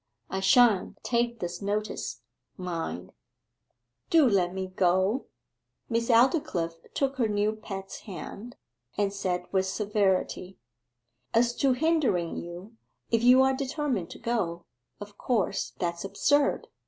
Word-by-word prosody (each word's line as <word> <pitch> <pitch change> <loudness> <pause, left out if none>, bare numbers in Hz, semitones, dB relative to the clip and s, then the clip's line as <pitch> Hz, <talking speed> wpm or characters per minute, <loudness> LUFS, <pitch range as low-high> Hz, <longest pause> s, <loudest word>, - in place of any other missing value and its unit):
I 190 - -1
shan't 195 0 +4
take 235 -1 0
this 175 +2 -4
notice, 210 +2 -3 0.3
mind.' 175 -3 -4 1.0
'Do 320 -5 +6
let 185 -5 +2
me 190 0 -3
go!' 185 +5 +1 0.6
Miss 230 0 0
Aldclyffe 230 - +3 0.2
took 275 -1 0
her 235 -4 +2
new 210 0 +1
pet's 195 -3 -7
hand, 205 +5 -8 0.4
and 200 -1 +1
said 180 -3 -2
with 190 -1 +1
severity, 190 -2 0 0.8
'As 240 +1 +4
to 270 -2 +3
hindering 260 - +1
you, 180 +6 -8 0.3
if 230 -1 +3
you 250 +2 +7
are 265 0 +3
determined 265 - -2
to - - -9
go, 195 -8 -2 0.3
of 205 0 -10
course 225 -8 -1
that's 170 -1 -2
absurd. 275 +9 +1
205 Hz, 125 wpm, -28 LUFS, 185-240 Hz, 1.0 s, you